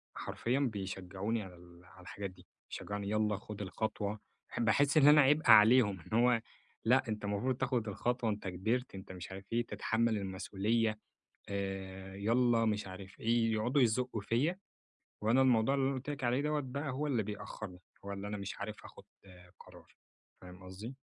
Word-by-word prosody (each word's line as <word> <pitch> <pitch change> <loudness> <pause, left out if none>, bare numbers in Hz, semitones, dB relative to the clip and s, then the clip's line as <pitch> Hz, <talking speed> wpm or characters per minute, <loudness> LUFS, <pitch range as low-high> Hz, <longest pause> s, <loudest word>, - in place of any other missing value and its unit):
حرفيًا 125 +4 -1
بيشجّعوني 100 -2 -2
على 90 -2 -11
ال 85 0 -17
على - - -16
الحاجات 100 -1 -6
دي، - - -19 0.2
شجّعوني 100 -1 -5
يلّا 105 -1 +1
خُد 105 0 -8
الخطوة، 105 +1 -3 0.3
ح - - -5
باحس 135 +6 +3
إن 145 -2 +7
أنا 150 0 +9
عبئ 145 0 +3
عليهم، 105 -2 +7
إن 110 +8 0
هو 120 -1 +4 0.4
لأ 130 +3 +4
أنتَ 105 -1 -3
المفروض 105 +6 0
تاخد 125 -4 0
الخطوة 120 +3 -1
أنتَ 105 -1 -5
كبرت 110 +7 -1
أنتَ 95 -1 -9
مش 90 0 -8
عارف 95 +1 -8
إيه 120 0 +1
تتحمّل 110 +2 0
المسؤولية، 105 +3 -1 0.5
آآ 95 -1 -5
يلّا 115 +3 +3
مش 105 -2 0
عارف 95 0 -10
إيه 115 0 +2
يقعدوا 120 +6 +2
يزقّوا 125 0 +1
فيّا، 140 - 0 0.6
وأنا 115 +5 +4
الموضوع 130 0 +4
اللي 135 -1 +1
أنا 135 - 0
قُلت 130 +2 -5
لك 145 -2 -4
عليه 125 +2 +2
دوّة 150 0 0
بقى 140 +2 -4
هو 145 +4 -2
اللي 120 -6 +1
بيأخّرني، 105 -2 -7 0.2
هو 100 - -4
اللي 100 +1 -5
أنا 105 0 -4
مش 100 -1 -6
عارف 105 +1 -6
آخد - - -13 0.6
قرار، - - -16 0.5
فاهم 90 0 -12
قصدي؟ 100 +8 -8
110 Hz, 175 wpm, -33 LUFS, 100-125 Hz, 0.6 s, أنا